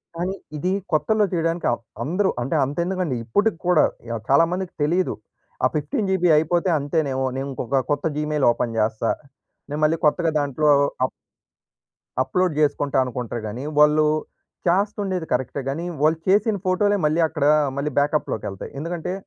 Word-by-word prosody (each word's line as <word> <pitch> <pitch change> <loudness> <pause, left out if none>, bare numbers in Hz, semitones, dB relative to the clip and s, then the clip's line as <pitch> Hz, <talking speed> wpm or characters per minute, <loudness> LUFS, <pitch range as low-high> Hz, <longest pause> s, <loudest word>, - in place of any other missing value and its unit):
కానీ, 180 +3 -2 0.2
ఇది 180 +5 -1 0.2
కొత్తలో 205 +8 +2
చేయడానికి 165 0 -1
ఆహ్, 120 - -2 0.2
అందరూ 185 +6 +1
అంటే, 135 +6 -1
అంత 140 +2 -6
ఎందుకండి 180 -7 -1
ఇప్పటికి 205 - +1
కూడా 180 -4 +5 0.3
య 115 - -2
చాలా 140 +4 +6
మందికి 185 0 -3
తెలియదు. 175 +5 +1 0.5
ఆ - - +7
15జీబీ 180 +4 0
అయిపోతే 170 +4 +1
అంతేనేమో. 140 -2 -1
నేను 135 +1 -3
ఇంకొక 135 +1 -1
కొత్త 145 0 0
జీమెయిల్ 150 -2 0
ఓపెన్ 120 -1 -2
జేస్తా. 110 +1 +1 0.6
నేను 145 +1 -3
మళ్ళీ 155 +2 +3
కొత్తగా 165 +2 +2
దాంట్లో 145 +1 0 0.4
అప్ 130 - +1 1.1
అప్లోడ్ 180 +6 0
జేసుకుంటా 145 -2 +1
అనుకుంటారు 120 -2 -4
గాని, 115 +5 -5 0.2
వాళ్ళు 150 +1 +5 0.6
చేస్తుండేది 195 -1 0
కరెక్టే 130 +3 -1
గాని. 160 +5 -3 0.2
వాళ్ళు 155 +2 +3
చేసిన 205 +2 +3
ఫోటోలే 205 +3 +2
మళ్ళీ 155 +2 +2
అక్కడ 145 - -2 0.3
మళ్ళీ 145 +2 -1
బ్యాకప్‌లోకెళ్తాయి. 140 -9 -2
ఎందుకంటే, 170 +3 -4
155 Hz, 145 wpm, -23 LUFS, 140-180 Hz, 1.1 s, ఆ